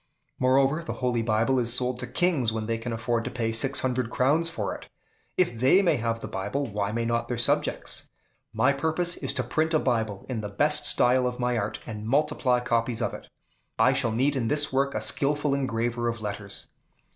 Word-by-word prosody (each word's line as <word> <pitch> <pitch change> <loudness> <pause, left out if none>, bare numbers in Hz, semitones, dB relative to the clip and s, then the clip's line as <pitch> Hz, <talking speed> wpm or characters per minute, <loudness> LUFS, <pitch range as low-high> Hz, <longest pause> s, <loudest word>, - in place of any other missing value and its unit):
Moreover, 135 +5 +2
the - - -4
Holy 120 -2 +1
Book 110 0 +1
is 120 -1 0
sold 125 0 +2
to - - -4
kings 160 -11 +1
when 110 -1 -3
they 115 0 -2
can 120 +1 -5
afford 115 +1 -1
to - - -4
pay 115 -2 -2
six 115 +4 +2
hundred 125 -2 -1
crowns 150 +8 +2
for - - -3
it; - - -11 0.5
if 175 -10 +2
they 135 - +5
may 180 - +2
have 115 -1 -2
the - - -5
Bible, 135 +9 -3
why 105 -3 -2
may 115 +1 -2
not 115 0 -1
their 120 - -3
subjects? 120 - 0 0.4
My 115 +5 +2
purpose 160 +5 -1
is - - -1
to 130 - -1
print 155 +7 0
a - - +4
Bible 110 -7 -1
in 120 -4 -3
the 105 - -5
best 150 +7 +3
style 125 +1 +4
of 125 0 -5
my 125 0 0
art, 105 -2 -3
and 110 -1 -7
multiply 140 -2 +1
copies 120 -1 -1
of - - -2
it. - - -9 0.5
I 125 +4 +4
shall 125 -4 0
need 135 +6 +1
in 120 -4 -1
this 150 +2 0
work 140 +1 +1
a - - -1
skillful 145 0 +1
engraver 120 -3 -1
of 115 -1 -2
letters." 105 -1 -6
125 Hz, 210 wpm, -26 LUFS, 115-140 Hz, 0.5 s, they